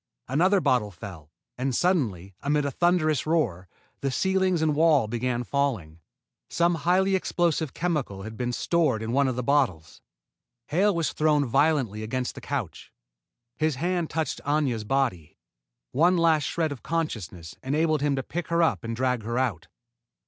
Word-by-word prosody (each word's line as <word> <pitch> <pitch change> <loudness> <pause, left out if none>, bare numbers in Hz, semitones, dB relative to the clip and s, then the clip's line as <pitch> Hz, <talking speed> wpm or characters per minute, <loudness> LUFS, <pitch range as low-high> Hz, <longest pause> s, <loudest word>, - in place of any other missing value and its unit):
Another 180 - +3
bottle 125 - +1
fell, 85 -5 -10 0.3
and, 130 -1 -1
suddenly, 110 - 0
amid 145 +1 +1
a 140 - -1
thunderous 155 -2 +1
roar, 115 - 0 0.3
the 140 - -1
ceiling 190 +4 +1
and 155 -1 +2
walls 150 -8 +3
began 120 0 -1
falling. 115 - -2 0.5
Some 170 +1 +2
highly 180 +4 +2
explosive 170 -5 0
chemical 150 - -2
had 110 +1 -7
been 125 +1 -2
stored 130 -3 +1
in 110 - -3
one 140 +2 +3
of 130 - -1
the 125 - -2
bottles. 95 - 0 0.7
Hale 195 +5 +2
was 165 -2 -1
thrown 150 -2 +2
violently 135 -5 +1
against 125 +3 -3
the - - -10
couch. - - -5 0.7
His 155 -2 +1
hand 175 +3 -1
touched 160 0 -2
Aña's 140 -6 0
body. 105 - -1 0.5
One 175 +6 +3
last 160 -3 +3
shred 160 -3 -1
of 140 - -7
consciousness 100 - -4
enabled 155 +2 +1
him 145 -1 +1
to 135 - -2
pick 175 +6 -5
her 170 0 +2
up 165 - +1
and 115 0 -3
drag 125 -1 0
her 115 +3 -3
out. 105 -10 -1
140 Hz, 160 wpm, -26 LUFS, 115-165 Hz, 0.7 s, Another